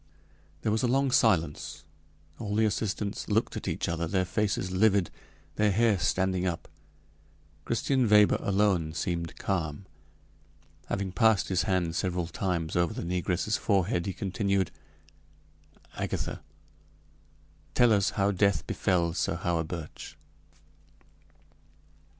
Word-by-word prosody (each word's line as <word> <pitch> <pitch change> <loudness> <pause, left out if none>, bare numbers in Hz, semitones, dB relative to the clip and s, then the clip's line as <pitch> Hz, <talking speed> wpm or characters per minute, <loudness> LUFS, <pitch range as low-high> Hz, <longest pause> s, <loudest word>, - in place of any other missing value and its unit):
There 110 - +1
was 110 - +1
a 125 - +2
long 135 +2 +2
silence. 90 - +1 0.6
All 105 -2 -3
the 110 +1 +3
assistants 105 -1 -2
looked - - 0
at - - -5
each - - -2
other, 85 0 -1
their 95 +2 +1
faces 100 -1 -1
livid, 100 -1 +3 0.5
their 105 0 +3
hair 110 -1 +3
standing 95 0 +1
up. 85 -2 -3 1.0
Christian 125 0 +1
Weber 105 -1 +5
alone 95 -6 +1
seemed 85 +2 -3
calm; 85 -2 -2 1.0
having 100 -1 -2
passed 110 -3 +3
his 90 -1 +1
hand 90 -3 0
several 90 -2 -1
times 85 -2 -2
over 85 -1 +1
the - - -4
negress's 90 +4 -1
forehead, 95 -3 +1
he - - 0
continued: 100 -1 -1 1.2
"Agatha, - - -3 1.3
tell 120 -3 +5
us 100 -2 +3
how 100 0 +3
death 100 +1 +1
befell 85 -3 0
Sir 85 - -1
Hawerburch." 85 -2 -4
95 Hz, 120 wpm, -28 LUFS, 85-105 Hz, 1.3 s, Weber